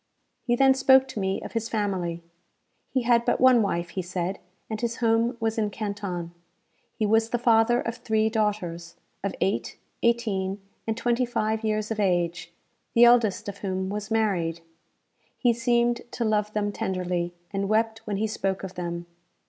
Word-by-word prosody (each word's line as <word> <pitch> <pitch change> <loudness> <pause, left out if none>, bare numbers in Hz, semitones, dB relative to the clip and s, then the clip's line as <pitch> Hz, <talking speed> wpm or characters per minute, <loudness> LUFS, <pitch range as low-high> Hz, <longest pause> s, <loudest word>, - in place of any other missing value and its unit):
He 240 - +1
then 270 +1 +5
spoke 265 0 +5
to 225 - -5
me 190 0 -1
of - - -7
his 230 -1 -2
family. 185 -6 -2 0.7
He 260 -2 0
had 235 0 +4
but - - +1
one 255 -2 +6
wife, 175 -4 -1
he 185 - -3
said, 180 +1 -3 0.3
and 220 -1 -4
his 235 -1 -1
home 230 +1 +1
was 225 0 -1
in 210 -1 +1
Canton. 200 -5 -4 0.6
He 215 - 0
was 225 +2 +3
the 240 - 0
father 235 0 +4
of 230 +1 -4
three 220 -2 +1
daughters, 200 -6 -2 0.3
of 200 - -2
eight, 195 - -1 0.2
eighteen, 205 -5 0 0.3
and 220 0 -1
twenty 240 +1 +1
five 220 -2 -1
years 215 0 -1
of 220 - -2
age, 175 -3 0 0.4
the 235 - +7
eldest 235 -5 +4
of 200 0 -6
whom 190 -1 -2
was 210 +1 -4
married. 185 -7 0 0.8
He 240 -2 +3
seemed 235 0 +1
to 235 - -1
love 210 -1 +1
them 205 -1 0
tenderly, 180 -3 -2 0.2
and 195 0 -2
wept 220 +1 +1
when 205 -2 -1
he 215 - 0
spoke 195 -3 -2
of 190 -1 -6
them. 170 -1 -4
215 Hz, 170 wpm, -26 LUFS, 190-230 Hz, 0.8 s, the